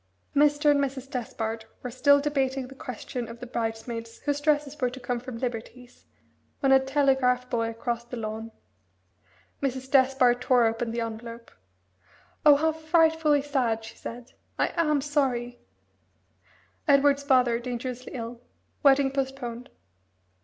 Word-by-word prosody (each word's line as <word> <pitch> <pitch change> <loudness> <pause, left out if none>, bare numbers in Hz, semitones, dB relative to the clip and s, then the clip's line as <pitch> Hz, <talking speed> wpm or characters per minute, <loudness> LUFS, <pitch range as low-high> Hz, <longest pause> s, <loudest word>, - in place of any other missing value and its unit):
Mr. 295 +1 +4
and 290 - +3
Mrs. 270 -1 -2
Despard 225 -2 -4 0.2
were 250 - -4
still 285 +3 +5
debating 270 -3 -1
the 270 - -11
question 250 -1 -6
of 230 +1 -10
the 250 - -7
bridesmaids 230 0 -4
whose 290 -1 -1
dresses 295 -1 +1
were 250 - +2
to 255 +2 -9
come 245 -1 -2
from 250 -1 -7
Liberty's 245 0 -6 0.5
when 270 -2 +2
a 265 - +8
telegraph 265 -2 +2
boy 230 -2 0
crossed 235 +1 -4
the 245 - -5
lawn. 220 0 -5 1.1
Mrs. 265 -1 -3
Despard 260 -3 +4
tore 250 -2 +4
open 225 +1 -1
the 235 +1 -2
envelope. 230 +1 -7 0.9
"Oh 295 -1 +8
how 320 +3 +2
frightfully 320 -2 +2
sad!" 245 -6 0
she 220 - -10
said. 240 +2 -9 0.3
"I - - +2
am 300 -4 +2
sorry! 255 -4 -1 1.3
'Edward's 280 0 +4
father 250 -4 +3
dangerously 250 +1 -5
ill. 235 0 -6 0.4
Wedding 275 -1 +5
postponed.'" 265 -3 -4
255 Hz, 140 wpm, -27 LUFS, 235-280 Hz, 1.3 s, a